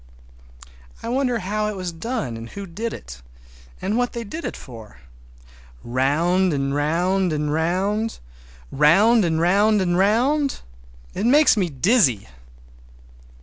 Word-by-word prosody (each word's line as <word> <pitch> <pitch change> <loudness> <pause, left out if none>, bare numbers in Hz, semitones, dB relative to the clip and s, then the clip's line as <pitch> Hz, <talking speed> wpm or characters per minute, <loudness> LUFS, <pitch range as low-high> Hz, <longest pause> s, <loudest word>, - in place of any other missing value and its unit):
I 230 - -4
wonder 250 -1 0
how 210 +1 -2
it 210 - -4
was 185 -2 -4
done 165 - -4
and 115 +1 -8
who 200 0 -8
did 215 +6 -5
it, - - -10 0.6
and 210 +5 -1
what 245 0 -1
they 235 - -4
did 315 +11 -7
it - - -5
for. 115 -5 -12 0.8
Round 160 +9 +1
and 140 -1 -1
round 175 +5 0
and 150 -1 -1
round—round 165 - +1
and 160 -2 0
round 205 +5 +3
and 175 -2 0
round—it 195 - -1
makes 290 +2 +5
me 190 -5 0
dizzy! 135 - +2
180 Hz, 125 wpm, -22 LUFS, 140-215 Hz, 0.8 s, makes